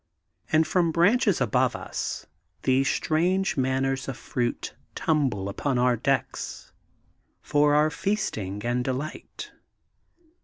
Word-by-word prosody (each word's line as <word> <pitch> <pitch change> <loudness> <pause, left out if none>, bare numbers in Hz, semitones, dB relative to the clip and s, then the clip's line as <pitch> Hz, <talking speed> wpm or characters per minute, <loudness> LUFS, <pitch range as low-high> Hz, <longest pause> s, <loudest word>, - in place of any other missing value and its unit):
And 160 0 +4
from 170 +1 +2
branches 200 +4 +3
above 125 -6 +2
us - - -4 0.4
these 135 +1 +3
strange 180 +5 +1
manners 130 0 0
of 135 - -4
fruits 120 -1 -2 0.2
tumble 130 -11 0
upon 130 +6 -1
our 125 0 +3
decks 130 +2 -2 0.7
for 145 0 +3
our 155 +1 +4
feasting 110 - -2
and 120 +1 0
delight. 135 +4 -5
135 Hz, 110 wpm, -26 LUFS, 125-160 Hz, 0.7 s, And